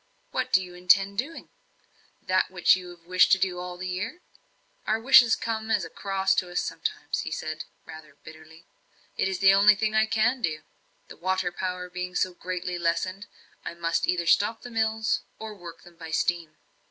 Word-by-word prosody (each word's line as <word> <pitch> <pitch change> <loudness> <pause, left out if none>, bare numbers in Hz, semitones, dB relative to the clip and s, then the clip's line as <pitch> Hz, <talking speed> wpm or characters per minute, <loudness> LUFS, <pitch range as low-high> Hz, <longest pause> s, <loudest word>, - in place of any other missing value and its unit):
"What - - -2
do 190 - +4
you 180 -1 -11
intend 195 +3 +3
doing? 305 +7 -5 0.7
That 185 0 +1
which 185 -1 +4
you 180 -1 -8
have 175 -1 -14
wished 185 +1 +4
to - - +6
do 185 -1 -1
all 180 0 -6
the 185 +1 -5
year?" 205 - -4 0.7
"Our 215 +1 +1
wishes 240 -1 +6
come 220 -1 -4
as 210 -5 +1
a - - -11
cross 195 -1 0
to 180 - 0
us 175 - -1
sometimes," - - -3
he - - -4
said, 155 0 -5 0.2
rather 155 -2 -12
bitterly. 160 +1 -14 0.5
"It - - 0
is 190 -1 -2
the 195 +1 +6
only 205 +2 +6
thing 215 +1 -1
I 220 0 +3
can 230 +4 +1
do. 155 -4 -2 0.4
The - - -12
water 185 +1 -1
power 180 0 -4
being 180 0 -6
so 185 - 0
greatly 180 0 -4
lessened, 185 +4 -1 0.4
I - - -6
must 170 -1 -1
either 175 -1 0
stop 210 +6 +2
the 245 - -9
mills, 220 -1 0 0.2
or 220 -1 -7
work 175 -4 -11
them 175 -1 -17
by 165 -1 -9
steam." 160 -1 -1
185 Hz, 190 wpm, -26 LUFS, 175-210 Hz, 0.7 s, to